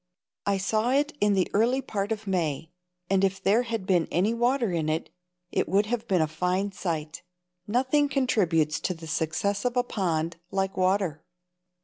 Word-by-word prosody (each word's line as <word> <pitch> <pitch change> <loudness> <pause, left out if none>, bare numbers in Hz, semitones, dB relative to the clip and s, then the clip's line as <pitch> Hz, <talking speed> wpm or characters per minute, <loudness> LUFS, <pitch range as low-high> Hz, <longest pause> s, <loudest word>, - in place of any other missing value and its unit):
I 200 -1 +2
saw 215 +4 0
it 290 +3 +1
in 205 0 +4
the 185 -2 +2
early 235 +6 +3
part 205 -5 -3
of 220 -1 -3
May, 165 -4 -1 0.4
and 195 0 +2
if 195 0 +1
there 210 +5 +3
had 230 -5 -3
been 180 -3 +2
any 195 +6 +2
water 240 -1 +1
in 160 -3 -1
it, 160 +2 -2 0.4
it - - 0
would 200 +2 +3
have 230 +1 -3
been 180 -4 +3
a - - 0
fine 180 +5 -1
sight. 160 -5 -4 0.5
Nothing 260 +6 +2
contributes 180 - +1
to 185 - -2
the 165 0 -10
success 160 +6 -1
of 250 0 -1
a 245 - +4
pond 170 -7 -1
like 195 0 -1
water. 185 -4 +1
195 Hz, 175 wpm, -27 LUFS, 170-225 Hz, 0.5 s, in